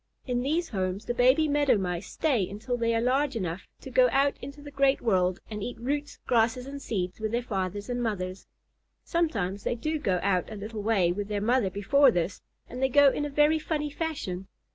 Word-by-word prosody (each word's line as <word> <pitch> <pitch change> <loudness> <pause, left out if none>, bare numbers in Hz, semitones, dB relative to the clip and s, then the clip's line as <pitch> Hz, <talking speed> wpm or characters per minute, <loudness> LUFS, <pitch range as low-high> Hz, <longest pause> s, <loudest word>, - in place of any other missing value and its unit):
In 245 -2 -1
these 320 +6 0
homes 190 0 -2
the 240 - -1
baby 255 +6 +4
Meadow 290 -4 +3
Mice 180 -1 -3
stay 250 - +1
until 220 +5 -3
they 230 -1 +1
are 225 - +1
large 265 +3 +1
enough 180 -4 -4
to - - -9
go - - +5
out 275 +1 +3
into 280 +3 -8
the 290 0 -10
great 275 -1 +3
world 185 -4 +1
and 210 -2 -6
eat 245 - -5
roots, 285 +4 -3
grasses, 240 +1 +2
and 280 +1 -7
seeds 185 -7 -3
with 220 -1 -2
their 240 +1 0
fathers 200 -2 -3
and 245 0 -2
mothers. 190 -5 -3 0.6
Sometimes 205 - -1
they - - 0
do 310 +6 -2
go 185 -9 0
out 190 0 +1
a - - -5
little 210 +1 -6
way 200 -5 +2
with 200 +3 -3
their 205 -1 -2
mother 230 0 +2
before 265 +9 +4
this, 175 -3 -1 0.3
and 250 +2 -7
they 265 - +3
go 285 +1 +6
in 295 - -2
a - - -3
very 295 +2 +3
funny 300 -1 -2
fashion. 280 - -4
235 Hz, 210 wpm, -28 LUFS, 200-280 Hz, 0.6 s, go